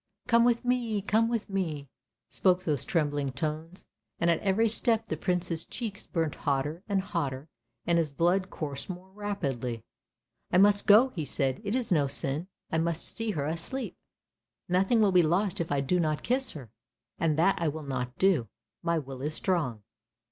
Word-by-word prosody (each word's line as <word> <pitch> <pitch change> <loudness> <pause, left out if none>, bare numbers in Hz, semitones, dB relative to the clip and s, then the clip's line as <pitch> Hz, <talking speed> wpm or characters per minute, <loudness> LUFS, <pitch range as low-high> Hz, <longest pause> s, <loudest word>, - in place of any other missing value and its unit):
" - - -38
Come 235 -1 +5
with 240 0 +2
me, 240 -4 +1
come 225 +3 +2
with 230 -2 -2
me," 165 -8 -3 0.4
spoke 185 -1 +2
those 150 -5 +1
trembling 145 -4 0
tones, 155 +5 -4 0.3
and 170 0 +3
at 165 - +1
every 205 +3 +2
step 225 0 +3
the 155 - -2
Prince's 175 -1 -1
cheeks 215 -4 -5
burnt 165 -3 -1
hotter 145 +4 -1
and 195 -1 +2
hotter 155 -7 -3 0.4
and 170 -1 +3
his 155 -3 0
blood 175 +5 +1
coursed 145 -4 -5
more 185 +1 -8
rapidly. 140 - -3 0.3
" - - -48
I - - +4
must 205 +1 +4
go," 220 +6 +7
he 170 -10 -4
said, 135 -1 -1
"it 205 +2 -1
is 250 -5 0
no 150 -5 +3
sin, 140 +4 0 0.2
I 160 - +1
must 170 0 -1
see 225 -1 -1
her 145 -4 -2
asleep, 170 - -3 0.7
nothing 190 +6 +3
will 205 -2 +4
be 180 -1 +6
lost 180 +4 +1
if 165 - -4
I 140 -1 +2
do 180 +7 +1
not 155 -3 0
kiss 260 +2 0
her, 130 -8 -10 0.5
and 155 -2 +1
that 175 +2 +3
I 165 - +1
will 155 +1 -3
not 130 -3 -4
do. 170 - +2 0.3
My 170 -1 +1
will 135 -4 -6
is 150 +2 -2
strong." 150 - -1
170 Hz, 185 wpm, -29 LUFS, 145-200 Hz, 0.7 s, go